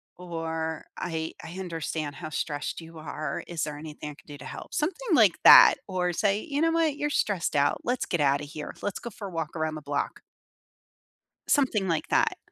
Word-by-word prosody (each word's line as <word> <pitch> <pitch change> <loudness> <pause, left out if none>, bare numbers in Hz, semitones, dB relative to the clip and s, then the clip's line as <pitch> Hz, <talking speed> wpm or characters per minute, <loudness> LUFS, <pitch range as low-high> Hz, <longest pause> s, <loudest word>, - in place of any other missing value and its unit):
or 165 -2 -4
"I 160 -2 -3
I 170 +3 -8
understand 160 -4 -4
how 160 -3 -6
stressed 150 0 -3
you 165 0 -11
are. 155 -1 -4
Is 170 -2 -3
there 150 -1 -4
anything 150 -1 -7
I - - -10
can - - -20
do 145 -1 -9
to - - -11
help?" - - -8
Something 385 +5 0
like 215 - +5
that. - - +10
Or 180 -2 0
say, 205 +3 +2
"You 290 +2 -2
know 330 - +4
what? 325 -3 +1
You're 295 - -1
stressed 200 - 0
out. 145 0 +2
Let's 250 +1 -1
get 175 - -1
out 140 0 +3
of 145 - -8
here. 150 -1 -7
Let's 205 - -2
go 235 - -6
for 205 -2 -8
a - - -8
walk 165 -1 -4
around 155 -1 -1
the 155 - -6
block." 145 0 -3 1.3
Something 230 -9 +2
like 165 -2 0
that. - - +2
165 Hz, 205 wpm, -27 LUFS, 155-205 Hz, 1.3 s, that